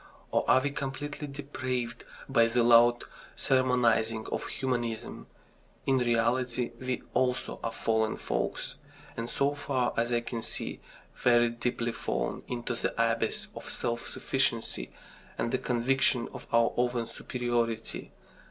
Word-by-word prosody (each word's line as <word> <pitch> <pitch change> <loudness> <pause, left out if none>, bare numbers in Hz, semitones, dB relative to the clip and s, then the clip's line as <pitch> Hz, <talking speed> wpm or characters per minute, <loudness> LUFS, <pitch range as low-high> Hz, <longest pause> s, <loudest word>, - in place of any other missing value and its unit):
Or - - +3
are 130 - +7
we 145 +1 -1
completely 145 +2 -4
depraved 130 -4 -4 0.2
by 115 -4 +4
the 120 +1 +2
loud 120 0 +6 0.3
sermonising 120 -4 +2
of - - -2
humanism? 120 -4 -3 0.6
In 135 -1 +3
reality, 120 +1 +1
we 130 -1 -2
also 125 -1 0
are 115 - -1
fallen 110 -1 +1
folks, - - -2 0.4
and, 115 +1 -4
so 140 +1 +1
far 135 -4 0
as 120 +1 +1
I 120 -1 +2
can 120 -1 -4
see, - - -2 0.4
very 120 -1 +4
deeply 120 0 -1
fallen - - -2
into 120 -1 -3
the 120 - -2
abyss 115 -1 +1
of - - -8
self 120 -1 -2
sufficiency 130 -4 -1 0.5
and 115 - 0
the 130 - +1
conviction 125 0 +2
of - - -9
our 115 0 +4
own 120 -1 +1
superiority. 115 -1 -2
120 Hz, 135 wpm, -30 LUFS, 115-130 Hz, 0.6 s, are